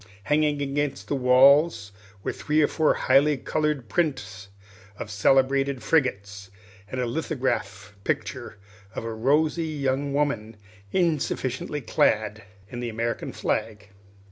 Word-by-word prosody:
Hanging 150 +2 +1
against 140 0 -2
the - - 0
walls 130 -2 +4 0.3
were - - -1
three 150 +1 0
or - - +4
four 160 -2 +2
highly 140 +2 +3
colored 150 -2 -2
prints 105 - -2 0.5
of 105 - -7
celebrated 135 +4 +2
frigates, 100 -8 -1 0.4
and 130 - -4
a 125 - 0
lithograph 120 - -3
picture - - -3 0.4
of - - -4
a 115 - -4
rosy 150 +8 +1
young 140 -2 -1
woman 120 -7 -1 0.3
insufficiently 150 - -1
clad 110 -2 +1 0.3
in 120 - -7
the 120 -1 -3
American 115 +1 -3
flag. 105 -1 -3
135 Hz, 120 wpm, -25 LUFS, 110-150 Hz, 0.5 s, walls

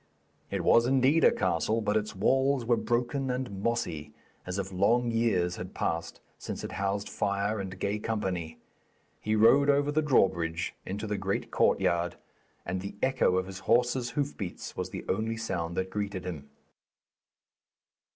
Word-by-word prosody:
It - - -2
was 115 +1 +5
indeed 135 +4 +4
a - - +7
castle, 95 +5 0
but 105 -1 0
its 105 -1 -1
walls 135 +5 +2
were 120 +1 +4
broken 125 +4 -1
and 125 -6 -3
mossy, 85 -11 -2 0.3
as 90 +1 -3
if 95 -1 -3
long 115 +6 +2
years 95 -7 +1
had 90 +1 -7
passed 80 0 -2 0.2
since - - -6
it - - -5
housed 100 +1 -2
fire 100 +1 -1
and 95 -1 -5
gay 100 +2 -1
company. 95 -7 -3 0.6
He 110 0 0
rode 135 +6 +5
over 145 +1 +3
the 155 +1 +2
drawbridge 85 - +1
into 100 +3 -4
the 105 -1 -2
great 95 0 -2
courtyard, 85 0 +2 0.5
and 90 +1 -2
the 100 - -6
echo 130 -8 +3
of 95 - 0
his 95 0 -8
horse's 120 +4 +2
hoofbeats 135 -10 -3
was - - -3
the - - -7
only 110 +3 -1
sound 85 -7 -3
that 95 0 -1
greeted 100 -3 -3
him. 75 -6 -6
105 Hz, 160 wpm, -29 LUFS, 95-120 Hz, 0.6 s, a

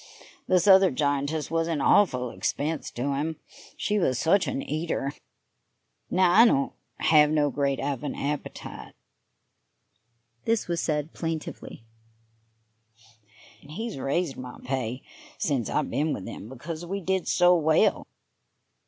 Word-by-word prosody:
This 180 -2 +3
other 190 -1 +7
giantess 145 +2 -1
was 165 0 +1
an 165 -3 -1
awful 125 - +3
expense 155 +2 -2
to 140 +4 -2
him, 155 +4 -2 0.4
she 210 0 0
was 130 -9 +1
such 175 +7 +3
an - - -2
eater; 155 -2 -2 1.0
now, 185 -1 +3
I 220 +6 +8
don't 140 - +2 0.3
have 150 -2 +5
no 150 -2 +2
great 140 -1 0
of 140 -2 -2
an 145 - -3
appetite" 145 +1 -5 1.5
this 225 -1 +1
was 170 -1 -1
said 150 0 -2
plaintively 160 -7 -5 1.8
"and 140 - -17
he's 220 +2 -5
raised 140 +3 -1
my 125 -1 -8
pay 125 -1 -3 0.3
since 135 -7 -1
I've - - -1
been 145 +5 0
with 95 - -6
him 105 - -8
because 155 +6 -7
we 195 +3 -3
did 190 0 -1
so 180 0 +5
well."... 160 -2 +2
155 Hz, 135 wpm, -26 LUFS, 140-175 Hz, 1.8 s, I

